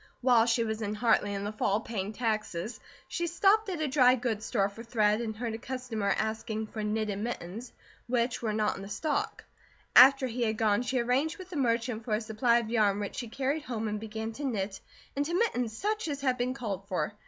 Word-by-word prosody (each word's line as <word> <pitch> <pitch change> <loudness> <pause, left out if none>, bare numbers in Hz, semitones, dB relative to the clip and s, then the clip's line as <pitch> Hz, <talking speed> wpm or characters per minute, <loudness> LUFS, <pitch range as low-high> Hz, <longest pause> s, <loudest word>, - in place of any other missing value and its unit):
While 240 -2 +5
she 230 0 +2
was 220 0 -3
in 210 0 -2
Hartley 215 -2 +2
in 200 0 -3
the 205 - -2
fall 210 -1 +1
paying 210 -3 -4
taxes, 215 -3 -2 0.3
she 345 -1 -2
stopped 395 +5 +3
at 355 -4 -3
a 310 - +1
dry 255 -2 +5
goods 230 -4 -2
store 200 -5 +2
for 200 +3 -10
thread, 215 -2 +2
and 220 -2 -3
heard 230 0 -3
a 225 - -5
customer 245 -5 -2
asking 220 0 -2
for 215 0 -6
knitted 210 -1 -1
mittens, 225 0 -5 0.4
which 240 0 0
were 225 -2 -1
not 210 0 0
in 195 0 -8
stock. 295 +10 -2 0.5
After 270 0 +9
he 245 0 -3
had 220 -2 +1
gone, 215 -1 +2
she 255 +1 -1
arranged 250 +6 +1
with 370 -1 -11
the - - -6
merchant 235 -3 0
for 220 -2 0
a 215 - -2
supply 230 +2 +2
of 230 -2 -2
yarn 210 -3 +3
which 205 -1 -4
she 240 - -3
carried 270 +6 -1
home 230 -6 -3
and 210 0 -2
began 220 +1 -5
to 290 - -7
knit 205 -7 -2 0.3
into 290 +5 -1
mittens 245 - 0
such 430 -1 -1
as 285 -2 -3
had 260 -2 +2
been 250 +1 -1
called 200 -7 -4
for. 190 +3 -1
230 Hz, 215 wpm, -30 LUFS, 215-255 Hz, 0.5 s, After